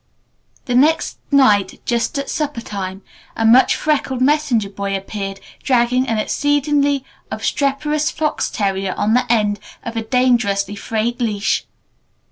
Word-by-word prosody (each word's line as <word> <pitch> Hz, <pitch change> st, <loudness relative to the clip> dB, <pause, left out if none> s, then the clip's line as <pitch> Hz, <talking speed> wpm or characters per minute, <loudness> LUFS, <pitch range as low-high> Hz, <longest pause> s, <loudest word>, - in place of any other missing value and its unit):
The 250 Hz, -, -2 dB
next 295 Hz, +6 st, +2 dB
night 210 Hz, -9 st, +3 dB
just 235 Hz, +4 st, -1 dB
at 280 Hz, -, -3 dB
supper 295 Hz, -5 st, -2 dB
time 195 Hz, -3 st, -6 dB, 0.3 s
a 225 Hz, -, 0 dB
much 245 Hz, +4 st, +6 dB
freckled 285 Hz, -4 st, -1 dB
messenger 255 Hz, -7 st, +1 dB
boy 200 Hz, 0 st, -3 dB
appeared 195 Hz, 0 st, -6 dB, 0.2 s
dragging 250 Hz, 0 st, +2 dB
an 225 Hz, -, 0 dB
exceedingly 285 Hz, +3 st, +1 dB, 0.2 s
obstreperous 295 Hz, +2 st, 0 dB
fox 310 Hz, -3 st, -1 dB
terrier 195 Hz, -2 st, -1 dB
on 215 Hz, +2 st, +1 dB
the 250 Hz, -1 st, +2 dB
end 210 Hz, -3 st, +1 dB, 0.2 s
of 235 Hz, -2 st, -6 dB
a 225 Hz, -, -1 dB
dangerously 220 Hz, -5 st, +1 dB
frayed 225 Hz, +4 st, -2 dB
leash. 210 Hz, -3 st, 0 dB
235 Hz, 130 wpm, -19 LUFS, 205-280 Hz, 0.3 s, much